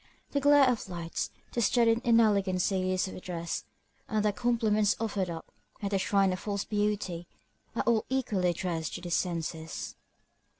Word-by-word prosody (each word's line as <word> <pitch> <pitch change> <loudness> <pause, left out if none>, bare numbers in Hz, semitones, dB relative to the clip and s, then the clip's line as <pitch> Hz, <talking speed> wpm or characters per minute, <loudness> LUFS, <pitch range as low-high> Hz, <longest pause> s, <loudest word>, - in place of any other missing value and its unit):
The 285 - +1
glare 285 -1 +6
of 235 -5 0
lights, 170 -2 -3 0.2
the 240 - 0
studied 230 +1 +3
inelegancies 195 -4 +2
of 185 - -8
dress, 170 -2 -4 0.4
and 215 -1 +1
the 210 - +3
compliments 215 -1 +2
offered 200 -5 -1
up 165 -1 -7 0.3
at 200 -2 -3
the 195 - +2
shrine 195 -1 +3
of 185 - -4
false 200 -1 -2
beauty, 205 -5 -1 0.5
are - - 0
all 230 -2 +2
equally 215 -9 +1
addressed 170 -2 -2
to 175 - -6
the 175 0 -6
senses. 165 -2 -2
200 Hz, 155 wpm, -30 LUFS, 180-225 Hz, 0.5 s, glare